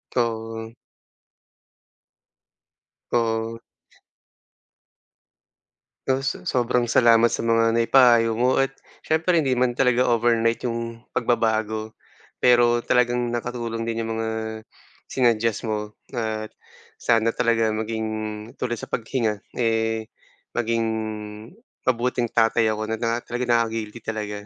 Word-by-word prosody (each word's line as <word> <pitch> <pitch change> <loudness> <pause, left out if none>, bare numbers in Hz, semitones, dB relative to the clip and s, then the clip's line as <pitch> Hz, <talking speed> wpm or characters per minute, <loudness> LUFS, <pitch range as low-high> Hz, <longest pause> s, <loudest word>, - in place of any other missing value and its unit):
Oo. 115 -1 -2 2.4
Oo. 115 -1 0 2.5
Oh, 130 0 +1
so 135 - -3
sobrang 125 -1 +1
salamat 115 0 +4
sa - - -1
mga 115 0 +3
naipayo 115 -1 +4
mo 125 +2 +3
at 135 - +1 0.3
siyempre, 160 +2 +2
hindi 130 -3 0
man 125 -1 +2
talaga 125 -1 +3
overnight 115 -1 +2
yung 115 -1 -4
pagbabago, 110 -2 -1 0.4
pero 120 -1 +4
talagang 120 -1 +2
nakatulong 120 -1 -3
din 115 0 -2
yung 115 - -3
mga, 110 0 -2 0.8
sinuggest 115 -3 +1
mo 105 -1 -4 0.2
at 110 -3 -3 0.5
sana 115 0 +2
talaga 115 -2 +2
maging 110 0 -2 0.5
tulad 120 -2 -3
sa - - -6
paghinga, 115 -3 -2 0.2
eh, 115 -1 0 0.5
maging 115 -1 0 1.0
mabuting 120 -1 0
tatay 115 0 +3
ako 110 0 -2
na 110 +1 -4
na 115 0 +1
talagang 120 +1 -3
nakaka-guilty 115 -2 0
talaga. 105 -2 -4
115 Hz, 105 wpm, -23 LUFS, 110-120 Hz, 2.5 s, salamat